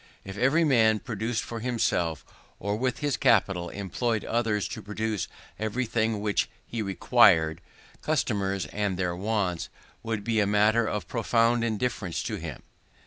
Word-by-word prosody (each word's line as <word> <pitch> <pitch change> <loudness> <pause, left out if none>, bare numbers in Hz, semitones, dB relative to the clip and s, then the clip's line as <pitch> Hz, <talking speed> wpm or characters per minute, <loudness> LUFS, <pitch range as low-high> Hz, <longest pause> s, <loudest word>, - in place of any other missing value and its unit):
If 95 0 -8
every 135 +10 +3
man 115 -7 +4
produced 110 +1 -3
for 115 - -6
himself, 110 -9 0 0.3
or 100 +2 -2
with 125 +3 -1
his 145 -5 0
capital 95 -6 +2
employed 110 +3 -2
others 110 -3 0
to - - -6
produce, 105 +1 -3 0.3
everything 110 -1 -1
which 105 -1 0 0.2
he 115 - -4
required, 95 -6 +4 0.4
customers 100 - 0
and 100 -3 -1
their 90 -2 -1
wants 95 -3 -1 0.3
would 110 -2 -3
be 115 -1 +1
a 100 - +3
matter 110 +3 +3
of 100 -5 -3
profound 115 +1 +2
indifference 110 -5 -2
to - - -3
him. 80 -6 -7
110 Hz, 140 wpm, -27 LUFS, 100-115 Hz, 0.4 s, man